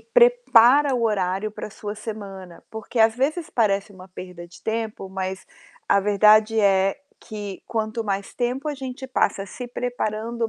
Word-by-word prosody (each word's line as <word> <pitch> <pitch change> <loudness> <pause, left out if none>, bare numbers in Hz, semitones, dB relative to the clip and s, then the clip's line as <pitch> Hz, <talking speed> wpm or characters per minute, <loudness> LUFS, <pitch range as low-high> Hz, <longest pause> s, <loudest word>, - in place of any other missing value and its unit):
prepara 295 - +5
o 235 - -1
horário 195 -1 0
para 215 - -7
sua 205 0 -6
semana. 200 -5 -8
Porque, 220 +2 -6
às 220 0 +5
vezes, 305 +6 -1
parece 205 -2 +1
uma 185 0 -13
perda 180 -1 -9
de 170 - -16
tempo, 220 -3 -3
mas 190 0 -5 0.4
a 200 - +4
verdade 210 +2 +4
é 195 -1 +3 0.2
que, 205 -3 -7
quanto 220 0 -2
mais 200 -1 -3
tempo 250 +4 -2
a 295 - -2
gente 265 -1 -7
passa 200 -6 0
se 245 +5 -8
preparando, 235 -1 -3
215 Hz, 155 wpm, -23 LUFS, 195-245 Hz, 0.4 s, prepara